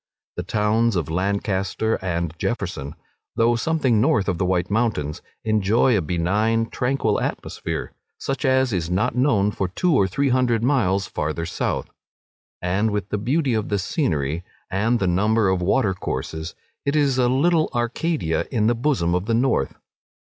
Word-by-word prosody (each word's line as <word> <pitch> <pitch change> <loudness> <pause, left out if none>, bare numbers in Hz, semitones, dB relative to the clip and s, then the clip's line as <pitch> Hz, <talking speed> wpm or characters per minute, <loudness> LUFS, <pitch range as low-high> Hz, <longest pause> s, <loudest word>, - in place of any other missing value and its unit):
The - - -2
towns 110 +1 +1
of 80 -4 -1
Lancaster 100 +3 -1
and 85 -3 -2
Jefferson, 85 - -3 0.4
though 115 +1 +3
something 130 -4 +1
north 130 -8 +2
of 90 -3 -1
the 95 - +1
White 90 +1 0
Mountains, 100 -10 0 0.2
enjoy 110 +3 +3
a 100 - +2
benign, 105 +8 0
tranquil 125 -5 0
atmosphere, - - -4 0.2
such 135 +2 -3
as 130 -3 +2
is 85 -3 -1
not 90 +6 +1
known 110 -6 +2
for 95 - -2
two 170 - 0
or 100 -6 +4
three 140 +9 0
hundred 125 -3 +2
miles 100 -8 +2
farther 80 +2 -3
south, 85 - -2 0.7
and 95 +5 +1
with 105 -3 -3
the 105 - -1
beauty 135 +4 +1
of 110 -2 -1
the 105 - +1
scenery 85 - -1 0.3
and 110 +6 +2
the 100 - -1
number 105 +4 +2
of 95 -1 +1
water 95 +2 +2
courses, 80 -3 -5 0.3
it 140 +1 0
is 140 -4 +2
a 125 -1 +3
little 155 +5 +2
Arcadia 120 - -1
in 110 -5 +1
the 120 - +4
bosom 120 - 0
of 90 +3 -1
the 115 - +2
north. 120 - +1
105 Hz, 165 wpm, -23 LUFS, 90-125 Hz, 0.7 s, or